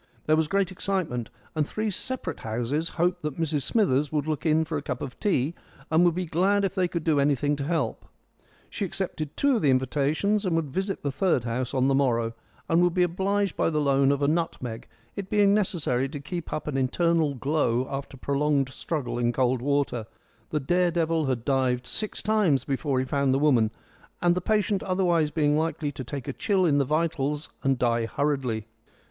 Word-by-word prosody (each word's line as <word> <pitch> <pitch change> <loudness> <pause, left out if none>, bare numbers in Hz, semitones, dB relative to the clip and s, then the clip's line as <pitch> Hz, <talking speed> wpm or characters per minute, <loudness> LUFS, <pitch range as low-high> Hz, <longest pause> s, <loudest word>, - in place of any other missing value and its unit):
There 155 - +4
was 160 -1 +1
great 195 +1 +1
excitement, 180 - -2 0.2
and 155 -2 0
three 215 0 -2
separate 200 - -3
houses 120 +9 -2
hoped 175 +2 +1
that 150 0 -4
Mrs 155 -3 0
Smithers 150 - +2
would 150 -2 0
look 155 +1 -2
in 160 +1 +3
for 160 - -4
a 145 - -1
cup 125 -3 -4
of 130 - -7
tea, 165 - +1 0.4
and 160 +2 +5
would 175 -2 +3
be 185 0 -1
glad 190 +5 +2
if 190 - -2
they 185 -2 +1
could 170 -2 -3
do 155 -3 +2
anything 145 +1 +2
to 140 - -3
help. 145 -7 -2 0.6
She - - -5
accepted 170 -5 -3
two 280 -3 +3
of - - -2
the 145 - +3
invitations, 145 - +1
and 180 -4 0
would 160 -4 -1
visit 190 +5 -2
the 140 - 0
third 150 -3 +1
house 125 +2 -2
on 130 0 +3
the 135 - +3
morrow, 120 -4 +1 0.3
and 165 +1 +3
would 175 -1 +2
be 180 - +4
obliged 195 +2 0
by - - +1
the 155 -2 0
loan 140 -1 +3
of 140 0 0
a - - +3
nutmeg, 145 -8 -2 0.3
it 195 -1 -5
being 205 -1 +4
necessary 165 - +1
to 145 0 -6
keep 170 +4 -6
up 155 - -3
an 140 -3 -1
internal 155 +2 +1
glow 130 -2 0
after 135 0 -6
prolonged 140 0 +1
struggle 130 -4 -3
in 120 0 +2
cold 125 0 +1
water 140 -5 0 0.4
the 150 - 0
dare 175 +5 +2
devil 165 -3 0
had 125 -3 -2
dived 130 -2 +1
six 215 -1 -3
times 205 -10 +2
before 140 0 -1
he 130 - +1
found 135 0 +1
the - - +3
woman 130 -7 +3 0.5
and 175 -1 +3
the 180 - -1
patient 210 0 +1
otherwise 175 -4 +1
being 150 -1 +2
likely 155 -1 -1
to 130 -1 -7
take 130 +2 -6
a 140 - -2
chill 195 - +1
in 145 -4 +3
the 140 - +2
vitals 150 -1 -1
and 135 -1 +1
die 115 -2 +1
hurriedly. 130 -6 -1
150 Hz, 205 wpm, -26 LUFS, 135-175 Hz, 0.6 s, and